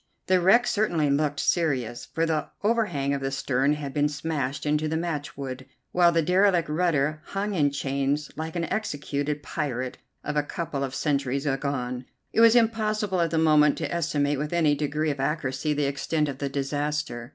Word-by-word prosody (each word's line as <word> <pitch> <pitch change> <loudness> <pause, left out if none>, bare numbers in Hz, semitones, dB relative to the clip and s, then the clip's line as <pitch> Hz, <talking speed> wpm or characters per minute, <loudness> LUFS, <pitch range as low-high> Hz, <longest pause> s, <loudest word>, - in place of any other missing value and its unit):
The 185 -1 +3
wreck 230 +7 +5
certainly 170 -11 +1
looked 145 0 +1
serious, 130 -9 0
for 160 +5 -1
the 160 -2 -1 0.2
overhang 195 -11 +1
of 140 - -2
the 135 - -1
stern 135 +1 +1
had 145 -2 -5
been 145 0 +2
smashed 145 -2 -3
into 150 +1 +1
matchwood, 140 -5 -4 0.2
while 175 -1 +5
the 165 -1 +2
derelict 180 0 +3
rudder 155 -2 +1
hung 200 +1 -3
in 150 -6 +3
chains 140 +1 -1
like 160 +2 -5
an 170 - -1
executed 145 -7 -2
pirate 130 -5 -3 0.2
of 150 - -3
a 150 - +3
couple 145 -1 -4
of 135 -1 -4
centuries 140 -2 0
agone. 135 -3 -2 0.3
It 225 - +4
was 230 0 +7
impossible 215 -4 +1
at 165 - +2
the 165 - -1
moment 150 -2 +4
to - - -3
estimate 145 -4 0
with 150 +3 -3
any 160 -4 +3
degree 150 +1 -1
of 140 - -6
accuracy 135 +1 -1
the 145 -1 +1
extent 145 +3 0
of 140 -2 -5
the 140 - -2
disaster. 140 -3 -2
150 Hz, 175 wpm, -26 LUFS, 140-165 Hz, 0.3 s, was